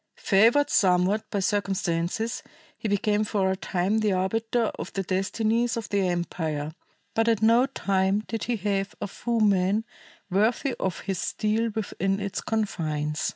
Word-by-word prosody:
Favored 230 +9 +4
somewhat 190 +3 +3
by 200 - -1
circumstances, 195 +1 -1 0.3
he 225 - -4
became 210 +1 +1
for 195 -2 +1
a - - 0
time 190 +3 0
the 210 -2 +2
arbiter 225 +5 0
of - - -5
the 195 - -1
destinies 220 +6 0
of 230 - -5
the 200 -2 +1
empire, 160 -4 -2 0.4
but 225 0 +1
at 225 -2 +2
no 235 +4 +5
time 195 -5 +1
did 225 -2 -3
he 245 - 0
have 195 -1 -2
a - - -2
foeman 205 -1 +1 0.4
worthy 220 +7 +1
of 190 -2 -2
his 195 -3 -3
steel 220 +2 0
within 195 -2 -1
its 200 -1 -3
confines. 155 -8 -1
200 Hz, 150 wpm, -26 LUFS, 190-225 Hz, 0.4 s, no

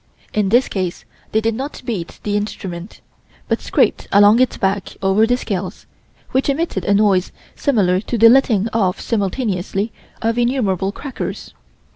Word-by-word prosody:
In 210 -2 +1
this 240 +5 +4
case 185 -3 -3 0.3
they 220 - +2
did 225 +1 0
not 270 +5 -6
beat 200 -9 -4
the 205 -1 -1
instrument, 190 -3 -5 0.5
but - - 0
scraped - - +1
along 205 +3 +6
its 255 -1 +2
back 195 0 -2
over 195 +3 +3
the 245 +1 +2
scales, 195 -5 -4 0.5
which 265 +2 +1
emitted 280 - -1
a 200 - +3
noise 200 -3 +2 0.2
similar 195 -10 +2
to 235 +4 -3
the 230 +1 +7
letting 230 -4 +4
off 190 -5 +1
simultaneously 205 -1 -2 0.3
of 230 +1 0
innumerable 210 -7 0
crackers. 270 +5 -6
210 Hz, 150 wpm, -19 LUFS, 190-240 Hz, 0.5 s, the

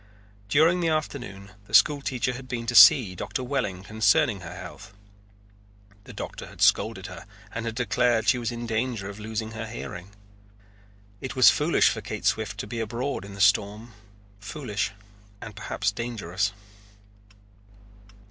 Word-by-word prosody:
During 160 +7 +4
the 170 - 0
afternoon 125 -11 -3 0.2
the 110 - 0
school 140 +9 +5
teacher 125 -2 -1
had 130 +1 -9
been 120 -2 -4
to 120 - -2
see 120 -7 +8
Doctor 125 +7 -4
Welling 120 -9 -2
concerning 105 0 +2
her 90 -1 -9
health. 100 +1 -10 1.1
The - - -10
doctor - - -7
had - - -15
scolded - - +2
her - - -9 0.3
and 115 0 -4
had 115 - -4
declared 120 0 +1
she 125 - +4
was 120 0 -2
in 120 0 -5
danger 115 -2 -2
of 100 - -12
losing 110 +1 -4
her 110 0 -6
hearing. 100 -5 -8 1.1
It 130 -1 -5
was 130 -1 +8
foolish 150 +3 +3
for - - -4
Kate - - -6
Swift - - 0
to - - -7
be 120 - -5
abroad 115 +2 -3
in 100 0 -10
the - - -11
storm, 105 +3 +2 0.5
foolish 105 0 -3 0.5
and 105 -2 -9
perhaps 100 0 -2
dangerous. 100 -4 -2
115 Hz, 155 wpm, -26 LUFS, 100-125 Hz, 1.1 s, see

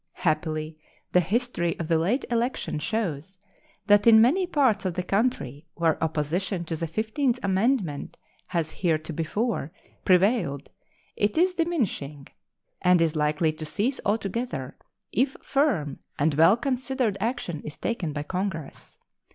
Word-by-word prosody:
Happily, 155 -1 -2 0.3
the 180 - +5
history 190 -2 0
of 165 - -4
the 165 -1 +2
late 210 - 0
election 235 -8 -1
shows 185 -2 -3 0.5
that 205 +1 +5
in 220 -1 +9
many 320 +12 +4
parts 260 - +2
of 185 -3 -2
the 180 - -1
country 180 - -1
where 165 -1 +1
opposition 170 +4 -1
to 165 - -3
the 165 +1 -3
fifteenth 225 - 0
amendment 195 - 0 0.3
has 165 -3 -1
heretofore 165 - -1 0.3
prevailed 180 - +2 0.5
it 205 +5 0
is 365 +2 +4
diminishing, 225 - -2 0.6
and 180 0 +5
is 165 -1 +1
likely 155 +1 +1
to 155 0 -8
cease 205 - -1
altogether 205 - -2 0.4
if 260 +5 +1
firm 250 - 0 0.2
and 150 +2 +2
well 165 +8 +5
considered 260 -4 -1
action 190 - -2
is 150 - -7
taken 195 -9 -2
by 145 0 -4
Congress. 180 -3 -5
185 Hz, 135 wpm, -26 LUFS, 155-235 Hz, 0.6 s, in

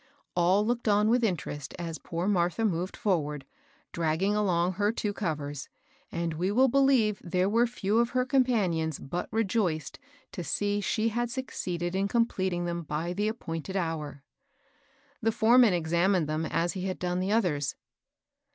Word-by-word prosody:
All 185 +4 +3
looked 240 0 -1
on 210 +1 +4
with 240 +1 +3
interest 155 -8 -2
as 165 -2 -5
poor 170 +2 -3
Martha 180 +2 +1
moved 180 -2 -1
forward, 150 -8 -1 0.5
draggmg 170 +5 +1
along 180 -4 +2
her 205 +3 +1
two 210 -2 -2
covers, 145 -8 -4 0.4
and 170 -1 -2
we 175 +4 -1
will 255 +5 +5
believe 255 -6 +3
there 180 +1 +1
were 230 +4 +3
few 220 -2 0
of 235 0 +2
her 255 0 +1
compan 250 -9 +2
ions 160 -2 -2
but 175 +6 -5
rejoiced 195 -8 -1 0.3
to 180 - -5
see 205 +5 -1
she 220 +3 0
had 240 +2 -1
succeeded 180 -9 -3
in 195 +1 +1
com 230 +2 +3
pleting 185 -5 -2
them 170 0 -2
by 165 +2 -3
the 205 +3 0
appointed 190 -4 -4
hour. 155 -6 -3 1.0
The 225 0 +2
foreman 230 -2 +5
examined 170 +1 +1
them 155 +1 -1
as 170 +1 0
be 190 - -5
had 185 -1 -2
done 180 0 -1
the 190 +2 -1
others. 165 - +1
185 Hz, 165 wpm, -28 LUFS, 170-220 Hz, 1.0 s, will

